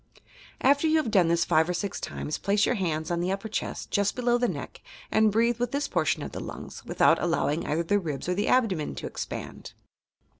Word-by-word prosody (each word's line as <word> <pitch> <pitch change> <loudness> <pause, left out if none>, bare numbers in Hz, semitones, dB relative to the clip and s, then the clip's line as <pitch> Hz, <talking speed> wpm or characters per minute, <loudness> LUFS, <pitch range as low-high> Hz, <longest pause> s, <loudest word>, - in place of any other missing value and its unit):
After 285 +4 +4
you 315 0 +4
have 300 -8 0
done 185 -5 +4
this 170 0 +2
five 160 +2 +3
or 180 - 0
six 200 +2 -3
times, 150 - -4
place 205 +1 +2
your - - +1
hands 160 -4 -2
on 170 - 0
the 180 +2 0
upper 195 +3 -3
cheat, 220 - -4
just 200 -1 +1
bplow 245 -1 +1
the 245 - +2
neek, - - -6 0.3
and 220 -1 +4
breathe 230 +2 +2
with 245 0 -1
this 285 0 0
portion - - 0
of - - -6
the - - -6
lungs, - - -8
without - - +3
allowing 165 -2 0
either 160 +3 0
the 205 +5 +2
ribs 155 -6 -4
or 180 - +1
the 205 +3 -1
abdomen 205 -12 +1
to - - -6
e.xpand. - - -6
200 Hz, 220 wpm, -27 LUFS, 170-235 Hz, 0.3 s, After